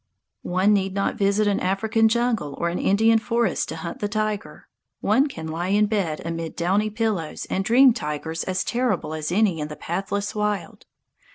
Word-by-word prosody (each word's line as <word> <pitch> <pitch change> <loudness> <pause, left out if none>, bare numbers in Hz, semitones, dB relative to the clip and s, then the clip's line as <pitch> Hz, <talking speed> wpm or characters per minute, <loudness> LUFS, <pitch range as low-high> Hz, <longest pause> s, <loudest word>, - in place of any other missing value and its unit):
One 185 +4 +2
need 195 -1 0
not 200 - 0
visit 200 +1 +2
an 205 - +1
African 220 +4 +2
jungle 225 - 0
or 170 - 0
an 175 - -3
Indian 225 +3 +4
forest 235 +1 0
to - - -4
hunt 170 +1 -6
the 205 - -1
tiger. 215 -1 -3 0.3
One 260 +8 +3
can 160 - -7
lie 165 +3 -3
in 205 +2 +3
bed 195 -8 -1
amid 165 -1 -4
downy 195 +5 +1
pillows 210 -7 -2
and 190 - 0
dream 250 +4 +6
tigers 160 - -4
as 185 0 -1
terrible 235 -10 -1
as 155 0 -3
any 190 -3 +2
in 150 - -3
the 150 - -8
pathless 195 +5 -3
wild. 210 -5 -3
200 Hz, 180 wpm, -23 LUFS, 170-215 Hz, 0.3 s, dream